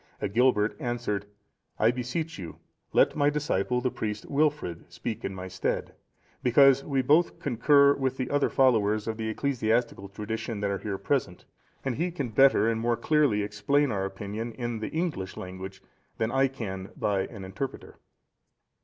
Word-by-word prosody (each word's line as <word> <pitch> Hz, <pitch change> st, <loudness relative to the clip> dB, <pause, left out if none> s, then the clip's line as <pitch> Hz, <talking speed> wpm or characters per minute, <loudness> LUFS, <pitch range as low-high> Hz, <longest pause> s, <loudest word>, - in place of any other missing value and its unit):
Agilbert 110 Hz, -1 st, +2 dB
answered, 120 Hz, -6 st, -2 dB, 0.5 s
"I 110 Hz, +2 st, +4 dB
beseech 125 Hz, +5 st, -4 dB
you, 85 Hz, -4 st, -7 dB, 0.4 s
let -, -, +4 dB
my 145 Hz, -1 st, +3 dB
disciple, 125 Hz, -5 st, 0 dB
the 125 Hz, 0 st, 0 dB
priest 105 Hz, -1 st, -4 dB
Wilfrid, 145 Hz, -, -1 dB
speak 115 Hz, 0 st, -5 dB
in 95 Hz, -, -3 dB
my 95 Hz, 0 st, -6 dB
stead; 95 Hz, 0 st, -2 dB, 0.5 s
because 135 Hz, +2 st, +5 dB
we 135 Hz, -3 st, 0 dB
both 155 Hz, +6 st, +3 dB
concur 140 Hz, +2 st, +4 dB
with 130 Hz, -2 st, -2 dB
the 130 Hz, -, -2 dB
other 145 Hz, -1 st, +2 dB
followers 110 Hz, -5 st, +3 dB
of 110 Hz, -1 st, -2 dB
the 110 Hz, -1 st, -2 dB
ecclesiastical 115 Hz, -4 st, 0 dB
tradition 105 Hz, +2 st, -4 dB
that 100 Hz, -1 st, 0 dB
are 100 Hz, -, -2 dB
here 100 Hz, -2 st, -3 dB
present, 100 Hz, -3 st, -2 dB, 0.4 s
and 130 Hz, -3 st, -1 dB
he 170 Hz, +4 st, 0 dB
can 145 Hz, -8 st, -4 dB
better 115 Hz, -2 st, +5 dB
and 115 Hz, -1 st, 0 dB
more 120 Hz, 0 st, +1 dB
clearly 135 Hz, -5 st, +2 dB
explain 105 Hz, +7 st, +1 dB
our 95 Hz, -2 st, -1 dB
opinion 105 Hz, +4 st, -5 dB
in 120 Hz, -1 st, -4 dB
the 110 Hz, -, -4 dB
English 155 Hz, -, -3 dB
language, 95 Hz, +1 st, -8 dB, 0.3 s
than 110 Hz, +1 st, 0 dB
I 135 Hz, +1 st, +3 dB
can 95 Hz, -8 st, -6 dB
by 100 Hz, -2 st, 0 dB
an 100 Hz, -5 st, -9 dB
interpreter." 95 Hz, +9 st, -6 dB
115 Hz, 160 wpm, -28 LUFS, 100-135 Hz, 0.5 s, because